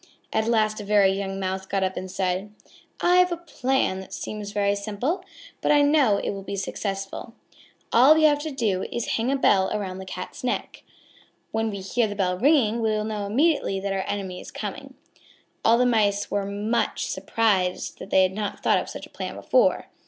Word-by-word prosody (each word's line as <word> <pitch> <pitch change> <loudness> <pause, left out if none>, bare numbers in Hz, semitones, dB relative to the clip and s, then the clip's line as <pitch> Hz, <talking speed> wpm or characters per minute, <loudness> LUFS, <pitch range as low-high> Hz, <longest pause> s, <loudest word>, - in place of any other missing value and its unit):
At 220 0 +1
last 215 -2 +1
a - - -7
very 200 -1 +4
young 195 0 -3
Mouse 190 0 -3
got 195 0 0
up 190 0 -1
and 185 - -5
said: 190 +2 -2 0.5
"I 355 +1 +4
have 360 0 +5
a 345 - -1
plan 265 - -1
that 190 - -10
seems 210 -1 -6
very 200 -1 +1
simple, 220 - -2 0.4
but - - +2
I 290 -1 +5
know 285 -8 +4
it - - -2
will 195 -1 -6
be 200 +1 -5
successful. 195 +3 -4 0.6
All 265 +6 +7
we 315 - +3
have 295 -1 +5
to 310 +1 -4
do 220 -9 -1
is 240 - -2
to - - -3
hang 235 +3 0
a - - +2
bell 195 -8 +3
about 190 -3 -3
the 190 - -7
Cat's 185 +4 -7
neck. 250 - -3 0.7
When 225 0 0
we 200 -2 -5
hear 220 +4 0
the 205 - -5
bell 185 -2 0
ringing 235 - +3
we 220 - +1
will 215 0 0
know 210 -2 -3
immediately 265 -3 +1
that 195 0 -2
our 190 -1 -1
enemy 190 -3 -4
is - - -10
coming." 265 +6 -7 0.7
All 230 +1 +5
the 250 - +3
Mice 205 -4 +1
were 200 -1 -1
much 210 +4 -1
surprised 190 -5 0
that - - -9
they 190 - +5
had 185 0 +1
not 205 0 -4
thought - - +4
of - - -6
such - - -7
a - - -18
plan - - -5
before. - - +2
210 Hz, 210 wpm, -25 LUFS, 195-240 Hz, 0.7 s, All